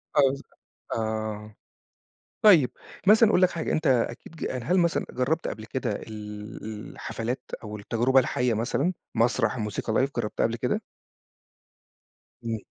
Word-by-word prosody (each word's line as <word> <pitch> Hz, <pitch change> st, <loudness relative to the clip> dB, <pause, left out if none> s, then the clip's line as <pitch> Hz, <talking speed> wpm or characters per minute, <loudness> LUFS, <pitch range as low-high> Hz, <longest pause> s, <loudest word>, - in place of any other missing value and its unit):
آه 145 Hz, -, +6 dB
بالض 135 Hz, +1 st, 0 dB, 0.5 s
آه، 110 Hz, -1 st, -3 dB, 0.9 s
طيّب 175 Hz, -12 st, +7 dB, 0.4 s
مثلًا 220 Hz, +1 st, +7 dB
أقول 185 Hz, -, +4 dB
لك 185 Hz, -, +6 dB
حاجة، 165 Hz, -, -2 dB
أنت 155 Hz, -1 st, +1 dB
أكيد 120 Hz, +4 st, 0 dB
ج 160 Hz, -, -3 dB, 0.2 s
هل 180 Hz, +8 st, +3 dB
مثلًا 170 Hz, -1 st, +2 dB
جرّبت 145 Hz, +6 st, 0 dB
قبل 110 Hz, -, -5 dB
كده 125 Hz, 0 st, -2 dB
ال 105 Hz, 0 st, -8 dB, 0.3 s
الحفلات 120 Hz, +3 st, -4 dB, 0.2 s
أو 105 Hz, -1 st, -6 dB
التجربة 120 Hz, +5 st, +3 dB
الحية 125 Hz, -1 st, +1 dB
مثلًا، 135 Hz, -, 0 dB, 0.2 s
مسرح، 115 Hz, +3 st, +2 dB
موسيقى 105 Hz, 0 st, -2 dB
لايڤ 135 Hz, +4 st, +2 dB
جربتها 105 Hz, -2 st, -1 dB
قبل 115 Hz, -, -3 dB
كده؟ 115 Hz, -, -1 dB, 1.6 s
إمم. 115 Hz, -1 st, -1 dB
120 Hz, 135 wpm, -27 LUFS, 110-145 Hz, 1.6 s, طيّب